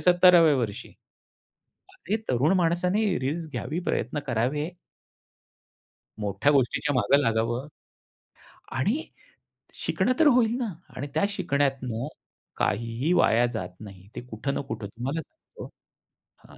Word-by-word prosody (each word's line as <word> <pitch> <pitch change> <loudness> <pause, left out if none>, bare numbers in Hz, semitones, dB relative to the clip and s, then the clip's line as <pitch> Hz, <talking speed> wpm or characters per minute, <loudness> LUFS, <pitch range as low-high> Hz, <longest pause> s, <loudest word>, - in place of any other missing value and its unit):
70व्या 175 -4 +6
वर्षी? 115 -1 -3 1.1
अरे! 220 - -2
तरुण 135 +8 +3
माणसाने 180 +5 +2 0.2
रिस्क 155 +4 -3
घ्यावी, 135 +8 -3
प्रयत्न 125 +6 -1
करावे. 135 +7 0 1.5
मोठ्या 100 +7 +1
गोष्टीच्या 140 +1 +1
मागे 140 +3 +4
लागावं. 115 +3 0 1.0
आणि 215 - 0 0.7
शिकणं - - 0
तर 315 - +6
होईल 240 -3 +4
ना 230 -7 -3 0.2
आणि 145 +3 -4
त्या - - +2
शिकण्यात 140 -8 0 0.7
काहीही 115 - 0
वाया 120 -7 +4
जात 95 -5 -3
नाही. 95 -2 -12
ते - - -5
कुठं 125 +3 -4
ना - - -2
कुठं 110 -2 -4
तुम्हाला 130 +10 -4
सांगतो 315 - -13 0.8
हां - - -16
140 Hz, 115 wpm, -26 LUFS, 115-175 Hz, 1.5 s, 70व्या